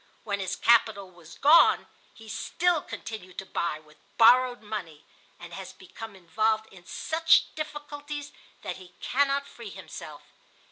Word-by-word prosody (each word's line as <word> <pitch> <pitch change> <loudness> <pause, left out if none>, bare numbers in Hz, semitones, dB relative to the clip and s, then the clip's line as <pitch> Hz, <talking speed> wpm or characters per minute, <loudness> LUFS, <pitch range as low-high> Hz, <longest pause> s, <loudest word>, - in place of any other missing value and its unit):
When 200 -2 -2
his 185 -2 -2
capital 215 -5 +3
was 170 -2 -15
gone 305 +4 +6 0.3
he 225 - -14
still 345 +8 0
continued 185 -10 -8
to 190 - -5
buy 170 -4 -2
with 155 0 -20 0.2
borrowed 245 +1 +6
money, 180 -8 -6 0.3
and 175 0 -10
has 190 +1 -8
become 205 +3 -10
involved 215 +5 0
in 180 -2 -16
such 325 0 +2
difficulties 295 -1 -6 0.3
that - - -4
he 185 -1 -15
cannot 280 +1 +1
free - - -10
himself. - - -10
220 Hz, 140 wpm, -27 LUFS, 185-280 Hz, 0.3 s, gone